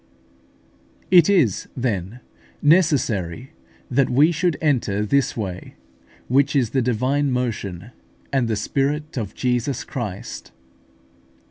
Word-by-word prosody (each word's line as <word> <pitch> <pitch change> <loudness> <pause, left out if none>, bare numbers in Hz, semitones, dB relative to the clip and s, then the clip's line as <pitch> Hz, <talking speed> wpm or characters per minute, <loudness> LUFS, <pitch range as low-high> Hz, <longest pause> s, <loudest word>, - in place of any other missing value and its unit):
It 175 -2 +7
is, 160 - +2
then, 115 -2 -3 0.4
necessary 135 - +1 0.4
that 135 +1 +2
we 145 +7 +4
should 170 0 0
enter 115 -9 0
this 135 +4 +1
way, 95 -5 -5 0.5
which 140 +3 +2
is 125 -6 +2
the 135 - +1
divine 130 +4 0
motion, 115 -5 -3 0.4
and 130 -4 +2
the 110 - 0
Spirit 145 +8 -2
of 110 -5 -4
Jesus 125 +1 -1
Christ. 105 -7 -6
125 Hz, 110 wpm, -22 LUFS, 110-145 Hz, 0.5 s, It